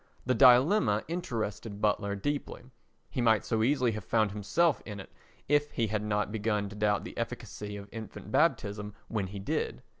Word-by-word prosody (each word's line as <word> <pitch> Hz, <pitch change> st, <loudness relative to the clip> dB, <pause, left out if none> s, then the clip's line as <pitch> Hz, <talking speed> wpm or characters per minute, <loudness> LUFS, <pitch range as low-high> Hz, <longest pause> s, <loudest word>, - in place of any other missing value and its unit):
The 130 Hz, -, +2 dB
dilemma 125 Hz, -, +5 dB
interested 115 Hz, -, -4 dB
Butler 100 Hz, -1 st, +1 dB
deeply: 145 Hz, +3 st, -3 dB, 0.5 s
he 125 Hz, -, -1 dB
might 110 Hz, -3 st, +3 dB
so 110 Hz, -1 st, 0 dB
easily 125 Hz, 0 st, +3 dB
have 110 Hz, -2 st, -5 dB
found 110 Hz, +2 st, +2 dB
himself 105 Hz, -, +1 dB
in 105 Hz, -2 st, -7 dB
it 95 Hz, -, -10 dB, 0.4 s
if 145 Hz, +1 st, +3 dB
he 115 Hz, -, +1 dB
had 110 Hz, 0 st, -1 dB
not 105 Hz, -1 st, -1 dB
begun 105 Hz, -2 st, -1 dB
to 105 Hz, -, -10 dB
doubt 105 Hz, -1 st, +1 dB
the -, -, -8 dB
efficacy 105 Hz, 0 st, -5 dB
of 100 Hz, 0 st, -9 dB
infant 110 Hz, -3 st, -8 dB
baptism 105 Hz, 0 st, +1 dB
when 105 Hz, -4 st, -1 dB
he 100 Hz, +2 st, -7 dB
did. 95 Hz, -, -2 dB
110 Hz, 175 wpm, -30 LUFS, 105-120 Hz, 0.5 s, dilemma